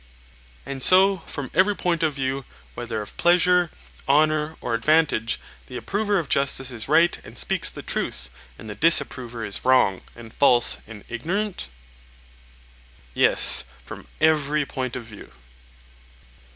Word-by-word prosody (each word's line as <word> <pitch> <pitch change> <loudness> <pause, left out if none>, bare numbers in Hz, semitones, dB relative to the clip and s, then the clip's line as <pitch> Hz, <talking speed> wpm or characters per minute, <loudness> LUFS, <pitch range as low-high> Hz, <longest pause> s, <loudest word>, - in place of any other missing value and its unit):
And 135 -1 -6
so 190 +5 +5
from 140 -3 -6
every 195 +2 +3
point 175 -4 -1
of 155 -3 0
view, 135 0 -3 0.3
whether 115 -3 -5
of 105 - -12
pleasure, 180 0 +3 0.4
honour, 155 +1 +2
or 120 - -4
advantage, 130 -2 +1 0.3
the 125 - -7
approver 205 - -1
of 165 -5 -2
justice 140 -1 0
is 115 -3 -5
right 170 +3 +3
and - - -13
speaks - - +1
the - - -8
truth, - - -1 0.3
and 110 - -11
the 105 - -6
disapprover 120 -5 +1
is 100 - -3
wrong 125 -7 +3
and 115 -1 -13
false 125 -4 +3
and 105 -2 -11
ignorant? 180 - -3 1.5
Yes, - - +4 0.2
from - - -11
every 150 -1 +2
point 130 -3 -5
of 125 - -6
view. 105 - -13
140 Hz, 140 wpm, -23 LUFS, 120-165 Hz, 1.5 s, so